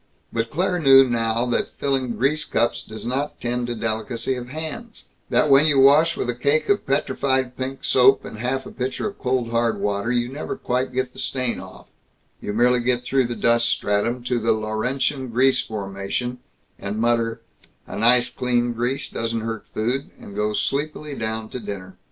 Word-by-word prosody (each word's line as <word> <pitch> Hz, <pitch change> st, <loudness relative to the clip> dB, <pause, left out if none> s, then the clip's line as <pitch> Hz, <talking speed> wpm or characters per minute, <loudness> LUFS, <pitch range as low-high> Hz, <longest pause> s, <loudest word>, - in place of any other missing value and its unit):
But 115 Hz, 0 st, -1 dB
Claire 180 Hz, +4 st, 0 dB
knew 135 Hz, -3 st, +7 dB
now 115 Hz, 0 st, 0 dB
that 120 Hz, -, -1 dB
filling 135 Hz, -3 st, 0 dB
grease 150 Hz, +4 st, +1 dB
cups 120 Hz, +1 st, 0 dB
does 110 Hz, +1 st, -8 dB
not 135 Hz, +4 st, -2 dB
tend 120 Hz, 0 st, -2 dB
to 120 Hz, -, -3 dB
delicacy 115 Hz, +2 st, -2 dB
of 125 Hz, -1 st, -6 dB
hands; 160 Hz, -, -7 dB, 0.2 s
that -, -, +3 dB
when 140 Hz, +2 st, +6 dB
you 145 Hz, -3 st, +4 dB
wash 150 Hz, +5 st, +5 dB
with -, -, -2 dB
a 125 Hz, -, 0 dB
cake 140 Hz, +6 st, +1 dB
of 205 Hz, 0 st, +1 dB
petrified 130 Hz, -2 st, 0 dB
pink 130 Hz, +1 st, -5 dB
soap 130 Hz, +1 st, +5 dB
and 110 Hz, -, -8 dB
half 130 Hz, +3 st, -2 dB
a -, -, -9 dB
pitcher 130 Hz, +11 st, -3 dB
of 200 Hz, 0 st, -8 dB
cold 125 Hz, -3 st, -1 dB
hard 115 Hz, -1 st, +1 dB
water, 100 Hz, +3 st, -1 dB
you 120 Hz, -1 st, +1 dB
never 140 Hz, +4 st, -5 dB
quite 125 Hz, +1 st, -1 dB
get 130 Hz, 0 st, -2 dB
the -, -, -10 dB
stain 130 Hz, -3 st, -1 dB
off -, -, -11 dB, 0.6 s
you -, -, -4 dB
merely 120 Hz, +3 st, +3 dB
get 125 Hz, 0 st, 0 dB
through 130 Hz, -2 st, +2 dB
the 120 Hz, -, -4 dB
dust 120 Hz, 0 st, +3 dB
stratum 115 Hz, +5 st, 0 dB
to 125 Hz, 0 st, 0 dB
the 115 Hz, +1 st, +2 dB
Laurentian 125 Hz, +5 st, -1 dB
grease 130 Hz, +3 st, +3 dB
formation, 105 Hz, +4 st, -4 dB, 0.4 s
and 100 Hz, +1 st, -4 dB
mutter, 115 Hz, 0 st, +1 dB, 0.4 s
"a -, -, -8 dB
nice 120 Hz, +2 st, +4 dB
clean 120 Hz, -1 st, 0 dB
grease 125 Hz, +4 st, -1 dB
doesn't 115 Hz, 0 st, -3 dB
hurt 115 Hz, -1 st, -5 dB
food," 125 Hz, +6 st, -2 dB
and 100 Hz, -, -11 dB
go 105 Hz, +1 st, 0 dB
sleepily 150 Hz, +5 st, -2 dB
down 110 Hz, -2 st, -4 dB
to 125 Hz, -, -5 dB
dinner. 95 Hz, -4 st, -7 dB
125 Hz, 185 wpm, -23 LUFS, 115-135 Hz, 0.6 s, knew